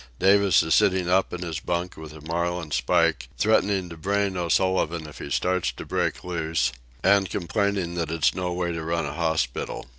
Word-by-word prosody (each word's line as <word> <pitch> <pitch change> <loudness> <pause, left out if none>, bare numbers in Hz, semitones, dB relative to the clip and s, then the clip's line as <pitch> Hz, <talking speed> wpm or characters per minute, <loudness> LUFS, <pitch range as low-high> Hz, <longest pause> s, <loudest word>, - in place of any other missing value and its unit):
Davis 100 +1 +4
is 80 - +1
sitting 95 -2 +3
up 95 +2 +2
in 90 0 -5
his 85 -2 -4
bunk 90 +2 -3
with 80 -1 -9
a 75 0 -12
marlin 85 0 -2
spike, 60 0 +1
threatening 100 -3 +2
to 85 - -9
brain 100 +3 -1
O'Sullivan 85 -2 +1
if 75 - -11
he - - -6
starts 90 +5 0
to - - -9
break - - -1
loose, 80 -6 -1 0.3
and 95 -1 +4
complaining 100 -1 -1
that 85 -2 -2
it's 80 -2 +2
no 90 -1 -2
way 90 0 -1
to 85 -1 -4
run 85 0 -1
a 70 - -4
hospital. 80 -7 -2
85 Hz, 185 wpm, -25 LUFS, 80-95 Hz, 0.3 s, Davis